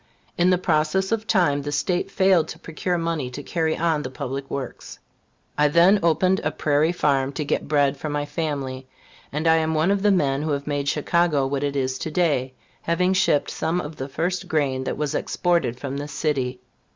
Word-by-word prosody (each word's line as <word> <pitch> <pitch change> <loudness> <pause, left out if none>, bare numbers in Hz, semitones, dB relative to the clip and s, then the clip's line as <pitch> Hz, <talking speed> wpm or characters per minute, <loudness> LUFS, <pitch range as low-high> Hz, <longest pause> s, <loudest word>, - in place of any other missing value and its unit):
In 175 +1 +3
the 180 - +4
process 175 +3 +1
of 225 -1 -1
time, 145 -6 +2
the 145 +1 -4
State 175 +6 0
failed 190 -5 +3
to - - -8
procure 175 +2 -3
money 165 -6 -2
to 140 +3 -7
carry 160 0 -1
on 160 -2 +1
the 130 - -5
public 135 +1 -5
works. 135 -3 -6 0.6
I 150 - +5
then 175 +7 +5
opened 185 +3 +2
a - - +1
prairie 150 +2 +1
farm 140 -5 +1
to 150 - -3
get - - -1
bread 145 -2 +2
for 155 - -5
my 145 0 -2
family, 140 -4 -4 0.4
and 150 +3 -3
I 160 0 +6
am 160 0 0
one 160 +5 +2
of 200 -1 +1
the 205 - +3
men 140 -8 +2
who 155 -1 -1
have 140 0 -3
made 145 -1 -1
Chicago 155 -2 +1
what 135 +1 -2
it 140 0 -1
is 130 -1 -1
to - - -3
day, 145 -6 0 0.3
having 180 +3 +1
shipped 185 -6 +2
some 165 +3 -1
of 155 -2 -6
the 135 +1 -5
first 180 +5 -2
grain 140 -5 0
that - - -3
was 150 -1 -2
exported 170 -9 0
from 140 +1 -4
this 145 0 -6
city. 130 -5 -1
150 Hz, 205 wpm, -23 LUFS, 140-170 Hz, 0.6 s, I